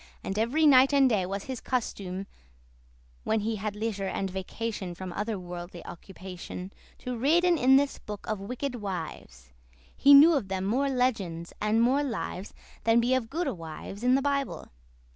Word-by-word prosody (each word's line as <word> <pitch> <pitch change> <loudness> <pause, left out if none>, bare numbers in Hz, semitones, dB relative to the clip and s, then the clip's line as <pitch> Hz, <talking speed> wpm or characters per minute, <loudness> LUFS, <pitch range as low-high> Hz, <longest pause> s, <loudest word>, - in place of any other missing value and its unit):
And 195 +2 -3
every 265 +8 +2
night 270 0 +6
and 275 -1 +6
day 205 -7 +1
was 195 +1 -4
his 260 -3 -6
custume 195 -6 -3 1.0
(When 220 -1 +1
he 220 +1 -2
had 205 0 -4
leisure 210 -2 -2
and 195 0 -2
vacation 190 0 -4
From 185 0 -7
other 210 +2 -2
worldly 175 -1 -8
occupation) 185 +1 -9 0.3
To 250 0 -2
readen 340 +8 +3
in 265 -3 +5
this 280 +1 +2
book 210 -1 -8
of 215 -2 -2
wicked 250 +7 -4
wives. 155 - -7 0.4
He 280 +1 +7
knew 310 +4 +9
of 270 -10 0
them 190 0 -2
more 265 +7 +1
legends 215 -11 -1
and 215 +2 +2
more 265 +4 +3
lives 220 -7 -4 0.3
Than 225 +2 +4
be 240 +2 +2
of 250 -3 0
goodde 315 - -2
wives 165 +5 -8
in 250 +1 +4
the 270 - +1
Bible. 280 -1 -2
220 Hz, 170 wpm, -28 LUFS, 190-260 Hz, 1.0 s, knew